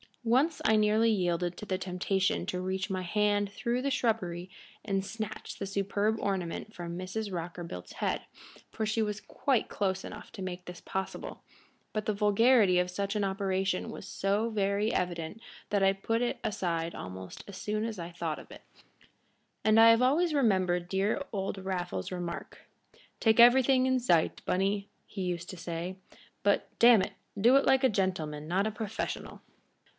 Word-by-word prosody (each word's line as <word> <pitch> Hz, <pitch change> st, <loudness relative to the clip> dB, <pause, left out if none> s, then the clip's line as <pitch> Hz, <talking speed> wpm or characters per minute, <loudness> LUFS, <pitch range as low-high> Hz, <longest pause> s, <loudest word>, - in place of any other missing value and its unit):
Once 265 Hz, +8 st, +2 dB
I 220 Hz, -, +5 dB
nearly 215 Hz, +2 st, +4 dB
yielded 175 Hz, -3 st, 0 dB
to -, -, -7 dB
the 185 Hz, -2 st, -2 dB
temptation 185 Hz, +1 st, 0 dB
to 180 Hz, -, -2 dB
reach 190 Hz, +2 st, -2 dB
my 185 Hz, -1 st, -1 dB
hand 205 Hz, +2 st, +1 dB
through 235 Hz, +4 st, -1 dB
the 280 Hz, -, 0 dB
shrubbery 185 Hz, -8 st, -1 dB, 0.4 s
and 195 Hz, -2 st, 0 dB
snatch 220 Hz, +1 st, -6 dB
the 195 Hz, -, -3 dB
superb 200 Hz, +2 st, 0 dB
ornament 195 Hz, +2 st, -3 dB
from 170 Hz, -1 st, -6 dB
Mrs. 195 Hz, +3 st, -4 dB
Rockerbilt's 170 Hz, -, -6 dB
head, -, -, -1 dB, 0.5 s
for 220 Hz, -, -2 dB
she 215 Hz, +1 st, 0 dB
was 210 Hz, -1 st, -2 dB
quite 265 Hz, -5 st, 0 dB
close 190 Hz, -2 st, -1 dB
enough -, -, -9 dB
to 200 Hz, -, -8 dB
make 180 Hz, -1 st, -5 dB
this 180 Hz, 0 st, -9 dB
possible, 190 Hz, 0 st, -5 dB, 0.5 s
but 215 Hz, -1 st, -2 dB
the 215 Hz, -, +1 dB
vulgarity 210 Hz, -1 st, +4 dB
of 180 Hz, 0 st, +1 dB
such 200 Hz, +3 st, -2 dB
an 210 Hz, -, +1 dB
operation 190 Hz, -1 st, -1 dB
was -, -, -8 dB
so 205 Hz, +4 st, 0 dB
very 205 Hz, 0 st, +1 dB
evident 175 Hz, +1 st, -2 dB, 0.3 s
that 200 Hz, -1 st, +2 dB
I 195 Hz, -, +6 dB
put 225 Hz, +4 st, -1 dB
it 245 Hz, -, -1 dB
aside 170 Hz, -5 st, -1 dB
almost 95 Hz, 0 st, -8 dB
as 200 Hz, -2 st, -8 dB
soon 215 Hz, +1 st, -2 dB
as 225 Hz, -2 st, -3 dB
thought 170 Hz, -3 st, -4 dB
of. -, -, -14 dB, 1.1 s
And 215 Hz, +1 st, +5 dB
I 225 Hz, 0 st, +9 dB
have 230 Hz, +1 st, +6 dB
always 310 Hz, +6 st, +3 dB
remembered 185 Hz, -9 st, +2 dB
dear 195 Hz, +7 st, +1 dB
old 195 Hz, -1 st, -3 dB
Raffles's 180 Hz, -, -3 dB
remark, 175 Hz, -2 st, -5 dB, 0.6 s
"Take 220 Hz, 0 st, +3 dB
everything 255 Hz, +2 st, +7 dB
in 260 Hz, 0 st, +3 dB
sight, 175 Hz, -10 st, +2 dB
Bunny," 200 Hz, +2 st, 0 dB, 0.2 s
he 195 Hz, -, -7 dB
used 175 Hz, -1 st, -3 dB
to 185 Hz, -, -9 dB
say; 170 Hz, +2 st, -5 dB, 0.5 s
"but, 200 Hz, 0 st, +2 dB
damn 235 Hz, -3 st, +7 dB
it, -, -, -4 dB, 0.3 s
do 240 Hz, +6 st, +6 dB
it 275 Hz, -, +5 dB
like 265 Hz, 0 st, +4 dB
a 260 Hz, -, +6 dB
gentleman, 160 Hz, -7 st, -1 dB
not 190 Hz, +5 st, +1 dB
a -, -, -1 dB
professional." 215 Hz, -1 st, -5 dB
195 Hz, 170 wpm, -30 LUFS, 180-220 Hz, 1.1 s, I